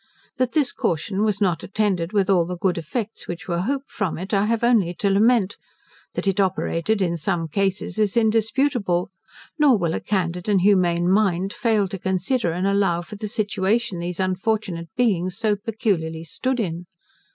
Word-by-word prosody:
That 255 -1 0
this 295 -5 +2
caution 190 +5 -1
was 210 -2 +1
not 180 -5 +1
attended 190 -5 -1
with 200 -3 +2
all 180 -4 +3
the 180 0 -4
good 180 -1 0
effects 215 +7 -5
which 175 - -6
were 170 -2 -1
hoped 275 +7 -3
from 190 -6 -2
it, 190 +5 -6
I 200 0 +3
have 230 0 0
only 215 -8 +3
to 200 +3 0
lament; 215 0 +3 0.6
that - - -2
it 195 0 +1
operated 190 +1 +1
in 170 -2 -1
some 165 0 -1
cases 195 +5 -1
is 210 +1 +1
indisputable; 220 -4 +1 0.5
nor 280 -6 +5
will 170 -4 -1
a - - -1
candid 180 -1 -2
and 200 -3 +3
humane 175 -3 +3
mind 195 -1 +2
fail 220 -5 +1
to 195 0 -6
consider 190 +3 0
and 180 +3 -2
allow 195 -4 +1
for 210 - -10
the 210 +1 -5
situation 205 -2 0
these 175 +1 -4
unfortunate 185 -2 -1
beings 185 -6 +1
so 220 -2 +1
peculiarly 195 -7 -2
stood 255 +10 -2
in. 175 -4 -3
195 Hz, 175 wpm, -23 LUFS, 175-220 Hz, 0.6 s, nor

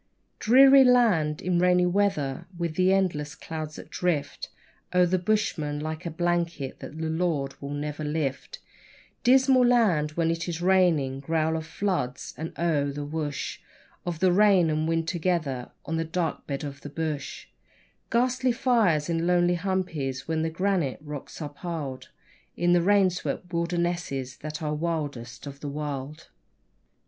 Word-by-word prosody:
Dreary 270 +4 +7
land 210 - +3
in 180 -1 +1
rainy 180 0 +4
weather, 175 -6 0
with 170 -2 -2
the 185 +3 +3
endless 170 -7 0
clouds 155 -2 -6
that - - -11
drift 170 -5 -2 0.5
O'er 180 0 +6
the 180 +1 +1
bushman 175 -7 0
like 155 +3 -4
a - - -1
blanket 170 -4 -2
that 155 - -9
the 160 0 -2
Lord 160 -4 -1
will 140 - -5
never 150 +1 -4
lift 150 - -3 0.7
Dismal 260 +1 +5
land 205 -12 +3
when 165 0 +1
it 165 +1 -3
is 165 -1 -3
raining 175 -8 +2
growl 160 +2 0
of 160 -1 -4
floods, 155 -11 -2
and, 160 +2 -5
oh! 155 -4 +1
the 145 +1 -5
woosh 150 -1 -4 0.4
Of 170 -3 -4
the 185 -1 +5
rain 190 -4 +5
and 155 +1 0
wind 165 0 0
together 165 -8 -1 0.2
on 165 - -2
the 165 - 0
dark 165 0 -3
bed 140 +1 -3
of 140 -1 -7
the 145 - -7
bush 150 -1 -4 0.6
Ghastly 255 +2 +2
fires 225 - +2
in 165 0 0
lonely 175 0 +3
humpies 165 -8 -2
where 160 0 0
the 160 - 0
granite 175 -4 0
rocks 150 +1 -7
are 145 - -4
piled 145 -4 -6 0.5
In 175 +1 +3
the 175 - +4
rain 195 0 +4
swept 180 0 -5
wildernesses 170 -6 -2
that 155 +1 -6
are 150 0 -1
wildest 150 -8 -4
of 140 -1 -8
the 145 - -5
wild. 145 0 -5
165 Hz, 155 wpm, -26 LUFS, 150-180 Hz, 0.7 s, Dreary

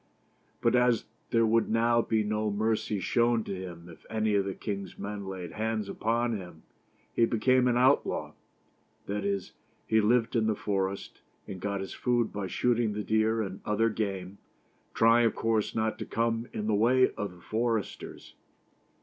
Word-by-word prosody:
But 115 +1 +3
as 125 -1 +3 0.2
there 115 -1 +3
would 115 +1 +2
now 115 +1 +3
be 110 -1 +1
no 105 0 -1
mercy 105 0 0
shown 115 +3 +2
to - - -5
him 90 -2 -8
if 85 -2 -14
any 110 -1 0
of 100 -1 +2
the 95 - -3
king's 100 -2 -5
men 100 -1 -5
laid 90 -3 -6
hands 110 0 -2
upon 115 +1 0
him, 90 -5 -9 0.5
he 115 - +4
became 125 +3 +3
an 120 -1 +2
outlaw; 130 +3 +2 0.7
that 100 0 -3
is, 100 -1 -2 0.3
he 110 0 +3
lived 115 +2 +2
in 110 -2 +2
the 110 - +1
forest, 100 -1 -3 0.3
and 95 - -6
got 100 +1 -2
his 95 - -6
food 120 -2 0
by 100 -2 -3
shooting 120 0 +1
the 105 0 -3
deer 110 +1 +2
and 95 -1 -6
other 110 +2 +1
game, 100 -3 -4 0.6
trying 115 +1 +5
of 110 - -2
course 115 -2 0
not 110 0 -1
to - - -4
come 115 +1 -1
in 105 - -4
the 110 - +1
way 125 +5 +4
of 100 -3 -5
the 90 - -17
foresters. 115 +1 -3
110 Hz, 175 wpm, -29 LUFS, 100-115 Hz, 0.7 s, trying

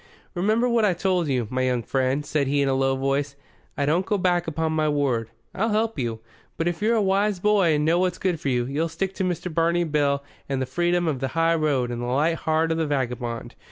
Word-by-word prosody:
"Remember 215 +6 +1
what 235 -2 +2
I 195 -4 +3
told 180 -2 0
you, 125 -4 0
my 130 0 0
young 125 -2 0
friend," 130 +5 0
said 145 -1 0
he 140 +1 +2
in - - 0
a 135 - +2
low 135 0 +1
voice. 135 +1 -1 0.4
"I 140 - +1
don't 165 +6 +2
go 205 +2 0
back 175 -2 +1
upon 160 0 -1
my 155 -1 +1
word. 130 -6 0 0.2
I'll 220 +4 0
help 215 -4 0
you. 115 -3 -3 0.4
But 165 - -1
if 175 +1 -2
you're 225 +2 +2
a 220 - +2
wise 200 +1 +1
boy 195 -5 +3
and 150 0 0
know 165 +2 +3
what's 180 -1 0
good 180 -4 -1
for 140 - -2
you, 120 -2 +1
you'll 150 +6 -1
stick 190 +4 -3
to 195 - -3
Mr. 180 -1 -2
Barney 170 +1 +2
Bill 145 -3 0 0.3
and 135 -1 -1
the 130 - -1
freedom 175 +5 0
of 145 -5 -1
the 135 - -1
high 165 0 +3
road 145 -6 0
and 120 0 -4
the 120 - -3
light 150 +7 +1
heart 160 +1 0
of 160 - 0
the 160 - 0
vagabond. 125 -4 -3
155 Hz, 245 wpm, -24 LUFS, 135-180 Hz, 0.4 s, I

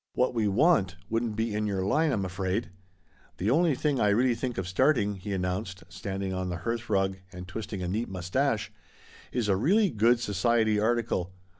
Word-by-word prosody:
What 125 0 +2
we 110 -3 +1
want 100 - +3 0.2
wouldn't 115 -1 0
be 110 0 -1
in 105 0 -1
your 95 -2 -1
line, 155 +9 +2
I'm 100 -7 0
afraid. 95 +3 -2 0.7
The 100 +5 0
only 160 +1 +3
thing 145 0 0
I 105 - +3
really 120 +4 +3
think 120 +1 -4
of 95 -2 -2
starting," 105 +1 +2
he 95 +2 -6
announced, 95 +1 -3
standing 95 -1 -4
on 95 0 -2
the 90 - -3
hearthrug 105 -5 0
and 90 -1 -9
twisting 100 -1 -5
a - - -2
neat 110 +6 -2
moustache, 90 -2 -1 0.6
"is 120 -4 -1
a 100 - +3
really 190 - +3
good 115 +2 +3
society 110 0 +1
article. 110 -5 0
105 Hz, 180 wpm, -28 LUFS, 95-120 Hz, 0.7 s, want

